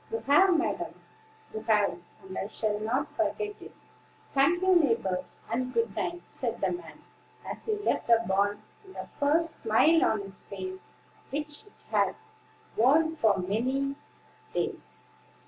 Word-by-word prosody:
"You 455 Hz, -, 0 dB
have, 345 Hz, +5 st, +5 dB
madam, 325 Hz, -, -2 dB, 0.6 s
you 220 Hz, -, -4 dB
have; 210 Hz, -5 st, +3 dB, 0.2 s
and 190 Hz, 0 st, -9 dB
I 195 Hz, -, -2 dB
shall 210 Hz, -1 st, -1 dB
not 245 Hz, +7 st, -1 dB
forget 420 Hz, -1 st, -1 dB
it. -, -, -10 dB, 0.6 s
Thank 330 Hz, +7 st, +3 dB
you, 375 Hz, -1 st, +5 dB
neighbors, 230 Hz, -, +1 dB
and 255 Hz, +2 st, -1 dB
good 460 Hz, 0 st, +1 dB
night," 350 Hz, 0 st, -3 dB
said -, -, -2 dB
the -, -, +1 dB
man, 350 Hz, 0 st, -8 dB, 0.4 s
as -, -, -6 dB
he 435 Hz, -, +2 dB
left 415 Hz, -, -1 dB
the 230 Hz, -1 st, +5 dB
barn, 200 Hz, +2 st, +1 dB, 0.2 s
with 385 Hz, -1 st, -15 dB
the -, -, -5 dB
first 315 Hz, +3 st, +2 dB
smile 310 Hz, +10 st, +4 dB
on 220 Hz, -, +2 dB
his 195 Hz, -1 st, -8 dB
face 375 Hz, -, -7 dB, 0.4 s
which 295 Hz, +6 st, -3 dB
it 415 Hz, -, -17 dB
had -, -, +2 dB, 0.6 s
worn 300 Hz, +8 st, +4 dB
for 220 Hz, -10 st, +3 dB
many 255 Hz, +9 st, 0 dB, 0.6 s
days. -, -, -3 dB
275 Hz, 150 wpm, -29 LUFS, 215-340 Hz, 0.6 s, have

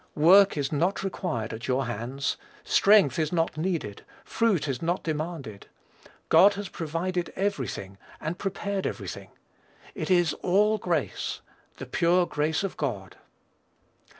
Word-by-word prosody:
Work 185 Hz, +4 st, +6 dB
is 140 Hz, -2 st, -1 dB
not 175 Hz, +7 st, 0 dB
required 160 Hz, -, -3 dB
at 110 Hz, +2 st, -6 dB
your 130 Hz, +1 st, +1 dB
hands; 120 Hz, +4 st, -3 dB, 0.3 s
strength 210 Hz, -, +4 dB
is 155 Hz, -1 st, 0 dB
not 165 Hz, -2 st, 0 dB
needed; 160 Hz, -, -3 dB, 0.2 s
fruit 220 Hz, -10 st, +1 dB
is 135 Hz, -3 st, -3 dB
not 175 Hz, +2 st, -1 dB
demanded. 155 Hz, -9 st, -5 dB, 0.6 s
God 200 Hz, +1 st, +6 dB
has 200 Hz, -2 st, -5 dB
provided 170 Hz, +2 st, -3 dB
every 200 Hz, +1 st, -1 dB
thing, 95 Hz, 0 st, -7 dB, 0.2 s
and 165 Hz, +4 st, -4 dB
prepared 195 Hz, 0 st, -2 dB
every -, -, -5 dB
thing. -, -, -7 dB, 0.6 s
It -, -, -5 dB
is 175 Hz, -3 st, +3 dB
all 210 Hz, +4 st, +3 dB
grace, 170 Hz, -7 st, -2 dB, 0.4 s
the -, -, -7 dB
pure 175 Hz, +1 st, +2 dB
grace 155 Hz, +2 st, -1 dB
of 195 Hz, -, -4 dB
God. 105 Hz, -, -4 dB
170 Hz, 140 wpm, -27 LUFS, 140-190 Hz, 0.6 s, Work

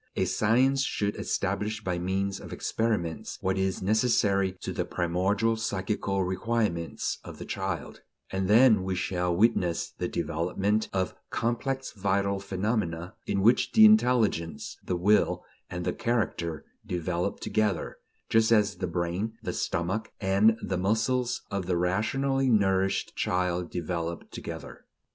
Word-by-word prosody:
A 95 Hz, -, +1 dB
science 125 Hz, +7 st, +3 dB
should 105 Hz, -6 st, -1 dB
establish 105 Hz, +2 st, -2 dB
by 90 Hz, -3 st, -1 dB
means 95 Hz, +2 st, -1 dB
of -, -, -10 dB
experiments 105 Hz, -8 st, -2 dB
what 95 Hz, 0 st, 0 dB
is 95 Hz, -1 st, -1 dB
necessary 100 Hz, -3 st, +2 dB
to -, -, -4 dB
the -, -, -1 dB
primordial 95 Hz, +6 st, 0 dB
psychical 100 Hz, -2 st, -1 dB
requirements 95 Hz, -2 st, -1 dB
of -, -, -9 dB
the -, -, -7 dB
child; -, -, -4 dB, 0.3 s
and 95 Hz, 0 st, -1 dB
then 110 Hz, 0 st, +6 dB
we 95 Hz, 0 st, -1 dB
shall 90 Hz, -1 st, -1 dB
witness 90 Hz, -4 st, +2 dB
the -, -, -3 dB
development 95 Hz, +6 st, -1 dB
of 95 Hz, -1 st, -1 dB, 0.2 s
complex 130 Hz, +3 st, -2 dB
vital 100 Hz, -1 st, 0 dB
phenomena, 95 Hz, -3 st, -2 dB
in 100 Hz, -, 0 dB
which 120 Hz, +4 st, +4 dB
the 220 Hz, -1 st, +8 dB
intelligence, 125 Hz, -, +3 dB
the 90 Hz, -, -1 dB
will, 105 Hz, +4 st, +3 dB, 0.3 s
and 90 Hz, 0 st, -4 dB
the -, -, 0 dB
character 85 Hz, -9 st, -1 dB, 0.2 s
develop 90 Hz, +2 st, -2 dB
together, 105 Hz, -6 st, -1 dB, 0.3 s
just 115 Hz, 0 st, +3 dB
as 105 Hz, -4 st, +3 dB
the 90 Hz, -, -2 dB
brain, 90 Hz, +6 st, -2 dB
the -, -, -3 dB
stomach, 95 Hz, +7 st, -2 dB
and 105 Hz, +3 st, +4 dB
the 95 Hz, -2 st, -1 dB
muscles 120 Hz, +5 st, 0 dB
of 100 Hz, -2 st, -2 dB
the 90 Hz, -2 st, +1 dB
rationally 130 Hz, +9 st, +1 dB
nourished 95 Hz, -3 st, +2 dB
child 90 Hz, -1 st, 0 dB
develop 85 Hz, -1 st, -4 dB
together. -, -, -8 dB
100 Hz, 135 wpm, -28 LUFS, 90-110 Hz, 0.3 s, the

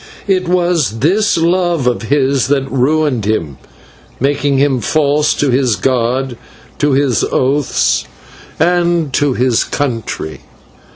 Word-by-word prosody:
It 185 Hz, -3 st, 0 dB
was 175 Hz, -9 st, +1 dB
this 195 Hz, +8 st, +2 dB
love 170 Hz, -3 st, +1 dB
of 125 Hz, -1 st, 0 dB
his 135 Hz, +2 st, +1 dB
that 135 Hz, -1 st, 0 dB
ruined 135 Hz, -2 st, +1 dB
him, 80 Hz, -11 st, -2 dB, 0.6 s
making 140 Hz, +1 st, 0 dB
him 135 Hz, -2 st, +2 dB
false 150 Hz, +1 st, +1 dB
to 145 Hz, -3 st, 0 dB
his 125 Hz, -3 st, +2 dB
god, 125 Hz, +3 st, -1 dB, 0.4 s
to 145 Hz, -1 st, +2 dB
his 135 Hz, -3 st, +1 dB
oaths, 135 Hz, -, 0 dB, 0.5 s
and 170 Hz, -3 st, +1 dB
to 145 Hz, -2 st, +1 dB
his 125 Hz, -2 st, +1 dB
country. 115 Hz, -, -4 dB
140 Hz, 120 wpm, -14 LUFS, 125-155 Hz, 0.6 s, this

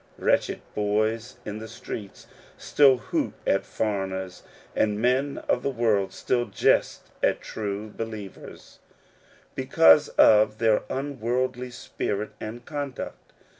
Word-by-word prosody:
WretchecJ -, -, +1 dB
boys 110 Hz, +3 st, -1 dB
in 105 Hz, 0 st, -5 dB
the 110 Hz, -, -7 dB
streets 110 Hz, -2 st, -8 dB, 0.3 s
still 135 Hz, -3 st, +4 dB
hoot -, -, -2 dB
at 95 Hz, -, +1 dB
foreigners, 95 Hz, -4 st, -3 dB, 0.3 s
and 105 Hz, -1 st, +1 dB
men 130 Hz, +4 st, +1 dB
of -, -, +2 dB
the -, -, -1 dB
world 115 Hz, -6 st, +1 dB
still 120 Hz, -1 st, 0 dB
jest 100 Hz, -, +1 dB
at -, -, +2 dB
true 105 Hz, 0 st, -5 dB
believers, 110 Hz, -3 st, -8 dB, 0.7 s
because 80 Hz, -, +5 dB
of 105 Hz, 0 st, +6 dB
their 110 Hz, -1 st, +3 dB
unworldly 130 Hz, -2 st, -2 dB
spirit 105 Hz, -3 st, -4 dB
and 115 Hz, +3 st, -7 dB
conduct. 145 Hz, -4 st, -6 dB
110 Hz, 115 wpm, -26 LUFS, 105-125 Hz, 0.7 s, of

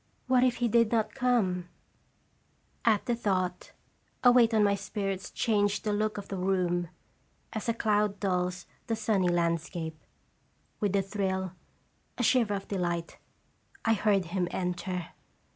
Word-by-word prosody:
What 255 Hz, -1 st, +4 dB
if 250 Hz, -2 st, +3 dB
he 240 Hz, -, 0 dB
did 230 Hz, -1 st, +3 dB
not 225 Hz, -2 st, +1 dB
come? 210 Hz, -9 st, +1 dB, 1.1 s
At 220 Hz, -3 st, +3 dB
the 240 Hz, -, +1 dB
thought, 185 Hz, -5 st, -1 dB, 0.5 s
a 245 Hz, -, +8 dB
weight 240 Hz, -2 st, +5 dB
on 220 Hz, -2 st, +4 dB
my 200 Hz, -1 st, +4 dB
spirits 195 Hz, -1 st, -3 dB
changed 205 Hz, -2 st, +1 dB
the 210 Hz, -, 0 dB
look 215 Hz, 0 st, 0 dB
of 200 Hz, -, -6 dB
the 195 Hz, -, -4 dB
room, 180 Hz, -2 st, 0 dB, 0.6 s
as 220 Hz, +1 st, -3 dB
a -, -, +3 dB
cloud 210 Hz, -2 st, +1 dB
dulls 180 Hz, -2 st, -1 dB, 0.2 s
the 230 Hz, -, 0 dB
sunny 210 Hz, -4 st, +1 dB
landscape. 170 Hz, -2 st, -1 dB, 0.8 s
With 205 Hz, -3 st, 0 dB
a 195 Hz, -, +3 dB
thrill, 190 Hz, -2 st, -2 dB, 0.7 s
a 245 Hz, -, 0 dB
shiver 225 Hz, -4 st, +3 dB
of 195 Hz, -, -6 dB
delight, 175 Hz, -3 st, -2 dB, 0.7 s
I 225 Hz, -, +4 dB
heard 205 Hz, -3 st, +2 dB
him 175 Hz, +1 st, -1 dB
enter. 180 Hz, -1 st, -3 dB
200 Hz, 145 wpm, -29 LUFS, 180-220 Hz, 1.1 s, a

